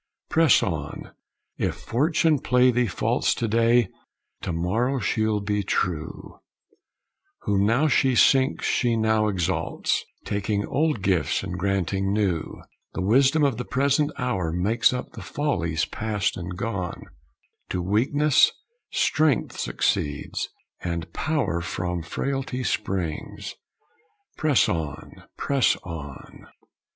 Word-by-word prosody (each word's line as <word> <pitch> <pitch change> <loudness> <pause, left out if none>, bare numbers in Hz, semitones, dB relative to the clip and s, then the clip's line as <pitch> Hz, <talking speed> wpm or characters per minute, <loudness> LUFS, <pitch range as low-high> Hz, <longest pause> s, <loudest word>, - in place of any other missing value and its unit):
Press 160 -5 +5
on! - - -4 0.5
If - - 0
Fortune 155 +4 +1
play 125 -1 +4
thee 120 0 +1
false - - 0
To 115 - -1
day, 115 0 +3 0.5
to 95 - -3
morrow 110 +11 0
she'll 110 -1 0
be 105 0 0
true; 90 -4 -3 1.0
Whom 100 0 +1
now 125 +8 +3
she 130 -2 +3
sinks 130 +1 +4
she 120 -2 +2
now 110 -1 +2
exalts, 95 -3 -1 0.2
Taking 100 0 -1
old 150 - 0
gifts 90 -7 +1
and 90 - -4
granting 95 0 0
new, 100 -6 -1 0.3
The 95 - -1
wisdom 135 +9 +4
of 135 -6 +2
the 125 - -3
present 140 +4 +1
hour 95 -10 -1
Makes 100 +7 +2
up 125 0 -4
the - - -9
follies 85 - -1
past 105 -2 -2
and 90 +1 -6
gone; 100 -4 -3 0.7
To 90 - -2
weakness 130 +10 +3 0.4
strength 155 -5 +1
succeeds, 75 -1 -1 0.3
and 85 -1 -4
power 130 - -1
From 90 0 -3
frailty 130 - -3
springs! 90 -9 -3 0.8
Press 150 -5 +3
on, 80 -4 -5
press 140 -4 +2
on! 75 -7 -9
105 Hz, 120 wpm, -25 LUFS, 90-130 Hz, 1.0 s, Press